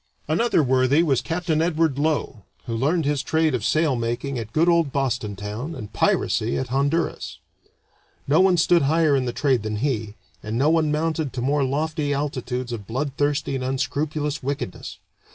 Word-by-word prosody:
Another 160 +2 +2
worthy 130 +4 +3
was 140 -6 +2
Capt. 175 +2 -4
Edward 160 -2 +1
Low, 150 -7 -1 0.2
who 115 -3 -3
learned 150 +7 +1
his 145 -1 +1
trade 160 +1 +1
of 120 -4 -1
sail 155 +2 +2
making 120 +3 -2
at 110 -1 -7
good 160 +7 +2
old 170 -4 +3
Boston 125 -7 -1
town, 105 - -5
and 105 -6 -8
piracy 110 +2 +1
at 130 - -3
Honduras. 140 +6 -1 0.9
No 150 +5 +4
one 190 -2 +4
stood 170 +1 +4
higher 155 +1 +3
in 130 -2 0
the 120 - -1
trade 130 -3 +1
than 110 0 -3
he, 110 -3 -2 0.3
and 110 +2 -4
no 145 +5 +3
one 160 -2 +2
mounted 155 -1 -1
to 125 - -3
more 140 +2 +1
lofty 145 +2 -1
altitudes 130 -3 -3
of 105 -4 -7
bloodthirsty 140 +3 -1
and 130 -1 -2
unscrupulous 145 +3 -2
wickedness. 135 -8 -5
140 Hz, 170 wpm, -23 LUFS, 125-155 Hz, 0.9 s, No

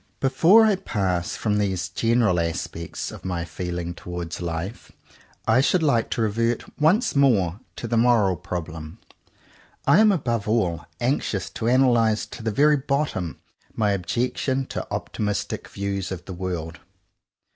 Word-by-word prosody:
Before 165 +12 +5
I 210 -3 +3
pass 90 - -1
from 105 -2 0
these 95 -3 -1
general 110 -2 +2
aspects 85 0 -4
of - - -11
my 90 -2 -2
feeling 85 0 -4
towards 90 -1 -6
life, 85 +6 -5 0.6
I 120 +4 +5
should 165 +4 +2
like 120 -7 +2
to 115 - 0
revert 115 +2 0 0.2
once 175 +8 +3
more 105 -10 +3 0.2
to 120 - -5
the 115 0 0
moral 115 -5 +4
problem. 80 -3 -6 0.9
I - - +6
am 215 -1 +6
above 120 - -1
all 85 -9 0
anxious 120 -5 -1
to 115 - -3
analyze 120 -4 +3
to - - -10
the 110 - -1
very 145 +7 +4
bottom 135 - -2 0.3
my 105 -2 +2
objection 125 +7 -1
to - - -5
optimistic 105 -3 -3
views 100 -1 -3
of 90 -2 -6
the 95 - -7
world. 85 -2 -4
105 Hz, 145 wpm, -24 LUFS, 90-125 Hz, 0.9 s, I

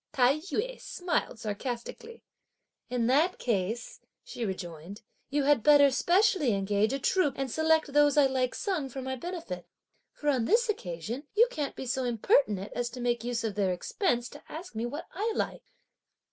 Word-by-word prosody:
Tai 270 +1 +4
yü - - -2
smiled 355 -8 -2
sarcastically. 240 - -5 0.7
"In 245 -2 0
that 300 +9 +3
case," 225 +1 -2 0.2
she 240 - -6
rejoined, 185 0 -6 0.3
"you 285 +1 +1
had 285 -3 +4
better 285 +2 +6
specially 345 - +3
engage 200 +3 +1
a 275 - 0
troupe 295 +2 +1
and 270 -2 -2
select 315 -1 +2
those 290 0 +4
I 290 - +7
like 260 -1 0
sung 340 -9 -2
for 265 +1 -6
my 260 0 -3
benefit; 315 - -6 0.4
for 295 - -2
on 255 -5 +2
this 470 - +3
occasion 225 - -4
you 465 +3 +6
can't 295 - -3
be - - -6
so 255 +1 -1
impertinent 215 -4 +1
as 240 0 -2
to 250 - -9
make 240 -1 0
use 240 -1 -2
of 220 -2 -1
their 195 -2 +1
expense 240 - -1
to - - -12
ask 345 +4 -8
me 225 +2 -2
what 290 +6 -6
I 425 +6 -1
like!" - - -3
260 Hz, 175 wpm, -29 LUFS, 225-305 Hz, 0.7 s, I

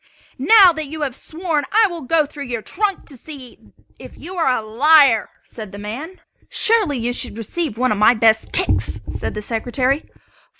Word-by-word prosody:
"Now 370 - +6
that 315 -2 -5
you 310 +2 -7
have 275 -4 -2
sworn 320 -1 -3
I 440 +1 +4
will 345 -3 -7
go 310 +3 +1
through 285 -1 -9
your 235 -3 -5
trunks 405 -1 -2
to 275 - -11
see 270 -2 -12 0.4
if - - -13
you 360 - -9
are 335 -6 +1
a 220 - -5
liar!" 265 +1 +4
said 215 -4 -9
the 200 - -10
man. 250 - -8 0.3
"Surely, 430 - +1
you 240 +1 -2
should 240 -3 -2
receive 235 - -4
one 255 +1 +1
of 210 - -1
my 215 +3 +5
best 220 0 +2
kicks," 100 +1 -1
said 105 - -5
the 210 - -4
Secretary. 250 +6 -1
275 Hz, 185 wpm, -19 LUFS, 225-320 Hz, 0.4 s, Now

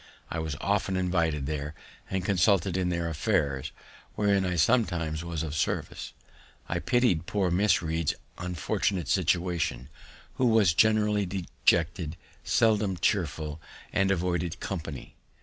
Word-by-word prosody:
I 80 - -2
was 80 -2 -3
often 100 -1 0
invited 85 -6 0
there 75 +1 -4 0.3
and 95 -2 -2
consulted 95 -1 +2
in 90 -1 0
their 85 -1 -1
affairs, 75 - 0 0.4
wherein 100 -2 +2
I 90 - -1
sometimes 85 -5 +1
was 85 -2 -3
of 75 -3 -4
service. 75 - -2 0.5
I 85 - -1
piti'd 90 -3 +2
poor 95 -4 0
Miss 90 0 +3
Read's 80 -1 0 0.2
unfortunate 90 +1 -1
situation, 85 -7 0 0.5
who 130 - +3
was 110 -6 +4
generally 105 0 +3
dejected, 85 -2 0 0.3
seldom 105 -4 +2
chearful, 80 -5 -1 0.3
and 95 -2 +2
avoided 90 -2 -1
company. 80 -7 -6
90 Hz, 125 wpm, -28 LUFS, 80-100 Hz, 0.5 s, was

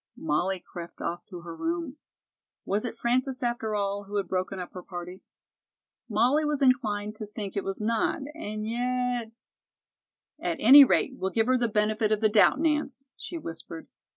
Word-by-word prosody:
Molly 175 +5 0
crept 170 -1 -10
off 175 +1 -4
to 180 -4 -9
her 170 -1 -8
room. 330 - -3 0.7
Was 205 +4 0
it 230 -1 -5
Frances, 255 +2 0
after 235 -3 -1
all, 200 0 -2
who 205 +1 -8
had 200 -1 0
broken 185 +1 -2
up 180 - -7
her 180 - -7
party? 180 0 -8 0.9
Molly 245 +8 +3
was 300 -1 0
inclined 215 -6 +1
to 215 - -6
think 205 -2 -6
it 200 - -1
was 195 0 -4
not, 225 +4 0
and 215 -9 -5
yet 245 0 -1 1.1
"At - - -2
any 275 +6 +10
rate, 265 0 +2
we'll 190 - 0
give 225 +3 +1
her 255 +2 +3
the 240 - +2
benefit 215 +1 +1
of 215 - +2
the 215 0 +3
doubt, 210 +6 +5
Nance," 300 -4 0
she 345 - -7
whispered. 165 - -8
215 Hz, 175 wpm, -27 LUFS, 195-250 Hz, 1.1 s, any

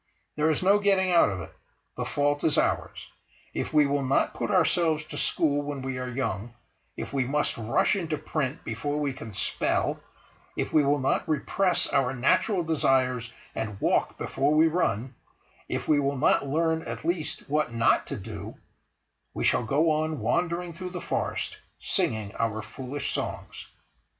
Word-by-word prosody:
There 150 +1 +2
is 160 - +1
no 200 +2 +5
getting 195 -2 +3
out 170 -10 +5
of 95 -2 -4
it; - - -10 0.4
the - - -3
fault 145 0 0
is 155 - +2
ours. - - 0 0.5
If - - -3
we 150 -1 +5
will 140 0 +1
not 135 +1 +1
put - - -3
ourselves 160 -3 +3
to 155 - -10
school 145 -2 +1
when 145 -2 -5
we 130 -1 -3
are 125 0 -4
young; 120 -3 -3 0.4
if - - -6
we 135 -2 +2
must 150 +3 +1
rush 115 - +1
into 165 -5 -2
print 150 -1 -3
before 145 +6 -3
we 145 -2 -1
can 115 -4 -8
spell; 100 - 0 0.6
if - - -2
we 155 - +5
will 140 +1 +3
not 135 +3 0
repress 175 +4 +1
our 135 -2 +1
natural 175 - +2
desires 130 -6 +1 0.2
and 105 -3 -4
walk - - +1
before 145 +2 0
we 155 +1 +6
run; 135 - 0 0.6
if - - -3
we 150 -2 +4
will 140 0 0
not 140 0 +3
learn 160 +3 +1
at - - -7
least 160 -2 -1
what 150 -2 0
not 115 0 +2
to - - -4
do—we - - -10
shall - - +3
go 150 +7 +2
on 155 -1 0
wandering 170 +8 -1
through 180 +2 -6
the 180 0 -5
forest, - - -3 0.2
singing 110 -2 0
our 110 -1 -1
foolish 135 +4 -4
songs. - - -4
145 Hz, 170 wpm, -27 LUFS, 130-160 Hz, 0.6 s, we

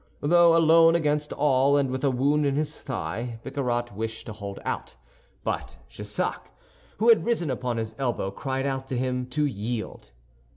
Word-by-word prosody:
Though 170 +2 +5
alone 165 0 +6
against 150 -2 0
all 140 -1 +3
and 135 -2 +1
with 130 +1 -3
a 140 - +4
wound 140 +4 +2
in 140 -1 +1
his 150 +1 -1
thigh, 115 +2 -5
Bicarat 120 -5 -2
wished 110 +1 -4
to 110 - -6
hold 100 -2 -7
out; - - -4 0.5
but - - -3
Jussac, - - -4 0.5
who 225 +2 +3
had 230 - +6
risen 200 - 0
upon 125 -2 -2
his 110 -1 -3
elbow, 120 -7 -1
cried 135 +5 -3
out 135 -1 -2
to 130 - -3
him 125 0 -1
to 150 +4 0
yield. 115 -3 -4
135 Hz, 170 wpm, -26 LUFS, 120-150 Hz, 0.5 s, alone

